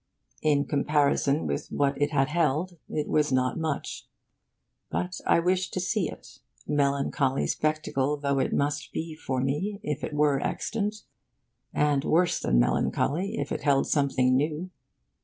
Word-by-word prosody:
In 145 -2 +2
comparison 145 0 +2
with - - -2
what 140 0 0
it 145 - +3
had 135 -2 +1
held, 165 +2 0
it 150 - -2
was 150 -2 +2
not 130 +3 +1
much. 155 -3 -3 0.8
But 180 0 -3
I - - +5
wished 185 +2 0
to - - 0
see 185 +1 0
it, - - -12 0.3
melancholy 140 -1 +1
spectacle 150 -2 0
though 140 -1 0
it 130 - 0
must 145 +1 -1
be 160 0 -4
for 130 -4 -2
me 180 +10 -1
if 150 -3 -3
it - - -3
were 145 -2 +3
extant, 210 -1 -2 0.7
and 145 -2 +2
worse 175 +3 +2
than 60 - +1
melancholy 175 - +1
if - - -3
it - - -2
held 140 -2 +3
something 135 -3 +2
new. 155 +6 -1
150 Hz, 150 wpm, -27 LUFS, 140-165 Hz, 0.8 s, I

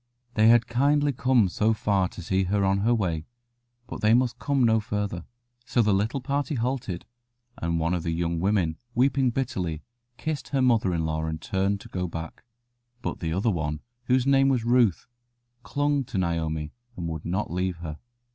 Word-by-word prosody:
They 110 -1 +4
had 120 0 +6
kindly 140 +4 +2
come 125 -4 +3
so 110 +5 +1
far 100 -3 +1
to 90 - -10
see 95 +2 +1
her 100 +1 +1
on 95 0 +2
her 115 +4 +2
way, 85 -7 -2 0.6
but - - -7
they 110 +2 +5
must 125 -1 +1
come 140 -2 +1
no 110 -1 +4
farther. 105 -4 -3 0.4
So 120 -1 +2
the 105 -1 +3
little 110 +8 0
party 140 +3 -1
halted, 120 -7 -2 0.5
and 85 0 -1
one 85 +2 0
of 90 - 0
the 85 - -3
young 85 0 -1
women, 90 -4 +1 0.2
weeping 130 +1 +3
bitterly, 95 - -2 0.3
kissed 155 -4 -3
her 135 -2 0
mother 115 -7 +3
in 80 -1 -1
law 80 0 -1
and 80 0 -3
turned 95 +3 -1
to - - -11
go 90 -1 -3
back. 80 -1 -7 0.6
But - - -3
the 80 -2 -2
other 100 +7 +1
one, 75 -4 -2 0.2
whose 130 0 +2
name 135 0 +4
was 125 -4 +1
Ruth, 120 -6 +3 0.6
clung 145 +1 0
to 115 - -5
Naomi, 80 -4 -1 0.2
and 85 -2 -3
would 80 -2 -5
not 95 +1 -2
leave 90 +1 -1
her. 80 -3 -7
100 Hz, 185 wpm, -26 LUFS, 85-125 Hz, 0.6 s, had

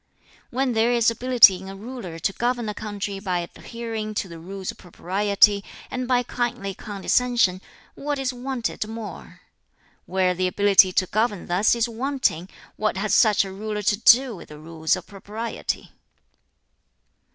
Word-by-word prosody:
"When 255 0 0
there 225 +2 +2
is 235 -1 +3
ability 235 -5 +6
in 190 - -9
a 195 - -8
ruler 210 -5 -8
to 170 +4 -1
govern 240 0 -1
a 210 - -2
country 205 -2 -5
by 185 -3 -1
adhering 215 +4 -6
to 200 - -2
the 170 -2 -10
Rules 190 +3 -6
of - - -19
Propriety, 200 +3 +2 0.3
and 255 -1 -3
by 250 -1 +2
kindly 240 -5 -3
condescension, 205 0 0 0.3
what 290 +1 -3
is 270 -1 -2
wanted 245 -3 -3
more? 225 -1 -9 0.7
Where 185 0 +1
the 185 +1 0
ability 195 0 +5
to 185 - +2
govern 210 -1 -1
thus 185 +7 +2
is 235 0 +1
wanting, 235 - -1 0.3
what 215 -2 -1
has 210 +2 -1
such 215 -3 +4
a 190 - -7
ruler 210 +1 -4
to 205 - +3
do 240 +2 +5
with 170 - -12
the 150 - -10
Rules 160 +2 -1
of 185 -1 -8
Propriety? 215 +3 -5
210 Hz, 160 wpm, -24 LUFS, 190-240 Hz, 0.7 s, ability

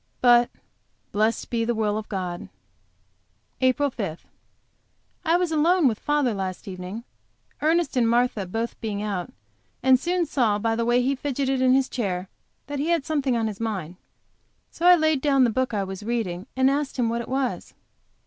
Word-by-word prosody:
But 240 -1 +5 0.6
"blessed 215 +2 0
be 230 -1 +1
the 235 +1 0
will 210 -1 0
of 215 0 -5
God." 180 -4 -4 1.1
APRIL 260 +2 +2
5. 190 -9 -5 1.0
I 330 0 +3
was 355 -2 0
alone 325 +1 +4
with 220 -3 0
father 295 -5 +1
last 190 -2 -4
evening, 185 +4 -6 0.6
Ernest 325 0 +2
and 235 -3 +3
Martha 235 -4 +1
both 225 +5 -4
being 210 -2 -3
out, 195 -4 -3 0.5
and 260 -1 +6
soon 350 +3 0
saw 240 -8 +1
by 225 +2 0
the 230 0 -1
way 240 +1 +3
he 270 +2 +2
fidgeted 270 -1 -1
in 255 0 +5
his 270 -1 +2
chair 190 -6 -3 0.4
that 285 0 -5
he 295 - -1
had 335 -5 +1
something 275 -6 0
on 225 - 0
his 210 -2 -4
mind. 195 -7 -3 0.8
So 345 - 0
I 360 - +9
laid 315 -4 +2
down 275 -2 +4
the 240 - +3
book 260 +2 0
I 205 -3 -1
was 190 0 -6
reading, 210 -5 -3
and 260 0 +3
asked 285 0 -2
him 245 -2 +2
what 235 +1 -1
it - - -9
was. 265 -1 -2
240 Hz, 180 wpm, -24 LUFS, 210-275 Hz, 1.1 s, I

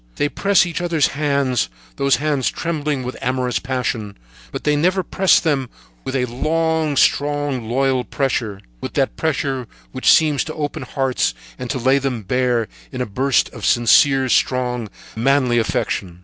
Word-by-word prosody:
They 145 - 0
press 200 +2 +3
each 175 0 -4
other's 170 -4 +2
hands, 140 - 0 0.3
those 140 -1 +3
hands 145 -1 0
trembling 150 -5 -2
with 125 +1 -5
amorous 125 -1 -1
passion; 125 -5 -3 0.3
but - - -6
they 150 0 +2
never 180 +5 +1
press 190 +2 +3
them 140 -6 -1 0.3
with 130 - -4
a 125 -2 +1
long, 155 +4 0
strong, 145 -6 +1
loyal 130 0 +1
pressure, 120 -8 -2 0.2
with - - -5
that - - 0
pressure 130 - -2 0.2
which 130 - +3
seems 150 -3 +4
to 155 - -6
open 145 -2 -3
hearts 130 - -1 0.2
and 125 -1 -5
to 135 - -1
lay 130 +3 +3
them 130 -5 -3
bare 125 0 0 0.2
in - - -6
a 125 - 0
burst 130 +5 +1
of - - -11
sincere, 130 +3 +4
strong, 125 0 0 0.3
manly 125 0 +2
affection. 90 -5 -2
135 Hz, 160 wpm, -20 LUFS, 125-145 Hz, 0.3 s, seems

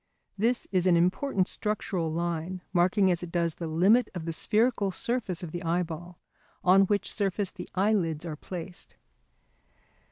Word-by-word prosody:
This 230 +5 0
is 185 -1 +2
an 175 -2 +5
important 185 +3 +1
structural 195 -6 -2
line, 170 +2 -3
marking 185 +2 +3
as 175 - 0
it 175 -1 -7
does 170 -2 0
the 165 - -5
limit 190 +10 +4
of 170 -2 -5
the 165 - -2
spherical 215 +3 +1
surface 215 -4 -2
of 165 - -6
the 175 - -5
eyeball, 175 0 -3 0.5
on 190 +2 +6
which 205 0 0
surface 200 -1 -1
the - - -9
eyelids 180 -5 +1
are 160 -2 -4
placed. 175 +3 -8
180 Hz, 155 wpm, -28 LUFS, 170-200 Hz, 0.5 s, on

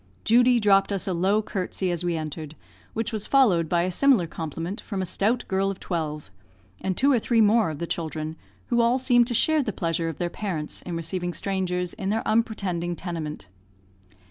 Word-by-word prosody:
Judy 245 +2 +5
dropped 200 -2 +4
us 195 -1 -2
a 190 - 0
low 195 +5 +2
curtsey 185 -2 -2
as 175 0 -3
we 175 -2 0
entered, 155 0 -6 0.4
which 225 0 -3
was 215 -2 -3
followed 190 - +4
by 170 -1 +2
a 185 - -1
similar 250 -2 +4
compliment 165 +5 -5
from 200 -4 -5
a 190 - -1
stout 225 +7 0
girl 195 +1 +1
of 195 - -5
twelve, 155 - -4 0.5
and 190 -1 -2
two 280 +2 +4
or 250 - +4
three 230 +1 +1
more 220 -2 +4
of 155 - -5
the 170 - -3
children, 160 -2 -4 0.3
who 240 -1 +3
all 235 +2 +3
seemed 245 -2 +4
to 240 - -1
share 315 +6 +3
the 230 - -2
pleasure 165 -3 -1
of 160 - -6
their 175 -1 -2
parents 170 -8 -4
in 175 - -5
receiving 175 +1 -3
strangers 180 -2 -2
in 195 -2 -4
their 220 +2 -1
unpretending 195 -6 0
tenement. 160 - -5
190 Hz, 195 wpm, -25 LUFS, 170-220 Hz, 0.5 s, Judy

